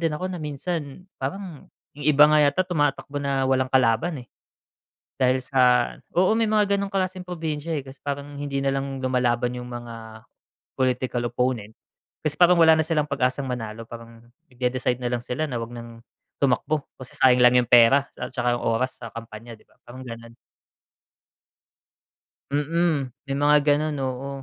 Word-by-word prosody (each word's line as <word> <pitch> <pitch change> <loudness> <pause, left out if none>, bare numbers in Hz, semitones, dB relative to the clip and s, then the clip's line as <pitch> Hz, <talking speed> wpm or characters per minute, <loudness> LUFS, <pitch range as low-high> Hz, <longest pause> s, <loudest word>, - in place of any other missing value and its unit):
din 165 -2 0
ako 185 +3 -4
na 175 - -6
minsan 150 +2 -5 0.2
parang 170 +3 -6 0.2
'yung 145 0 -3
iba 150 0 +7
nga 150 0 +4
yata 145 +6 +3
tumatakbo 145 -4 -1
na 140 -1 0
walang 130 0 +1
kalaban, 130 +3 +1
eh. - - -36 0.9
Dahil 130 -1 +2
sa 125 -2 +3 0.2
oo, 185 +5 +3
may 225 0 +2
mga 210 -2 +3
gano'ng 200 0 -3
klaseng 185 -1 -1
probinsya, 160 -2 -3
eh, - - -5
kasi 135 +1 -12
parang 145 0 -5
hindi 140 -1 -3
na 135 0 0
lang 135 0 -3
lumalaban 125 -1 0
'yung 125 0 -6
mga 115 -2 -9 0.5
political 125 -1 0
opponent 125 -4 -1 0.6
kasi 150 - +2
parang 175 0 +6
wala 160 -1 +7
na - - +3
silang 155 -3 0
pag-asang 130 +1 -1
manalo. 115 -2 -5
Parang 115 0 -11 0.3
nagde-decide 125 0 -1
na 125 - -3
lang 120 -1 -2
sila 155 +5 -2
na 125 -5 -4
huwag 115 - -7
nang 115 -1 -10 0.4
tumakbo 140 +3 +1 0.2
kasi 130 - -10
sayang 125 -1 +5
lang 125 0 +6
'yung 120 -2 0
pera 125 +4 +6
at - - -5
tsaka 120 -1 +1
'yung - - -7
oras 120 +3 0
sa 115 - -7
kampanya, 115 0 -9
'di - - -24
ba? - - -30
Parang 130 +2 -10
gano'n. 115 -1 -10 2.2
Mm, 145 -2 0 0.2
may 135 - -1
mga 145 +1 +5
ganun, 150 +1 +1
oo. 130 +1 -3
135 Hz, 170 wpm, -24 LUFS, 125-150 Hz, 2.2 s, iba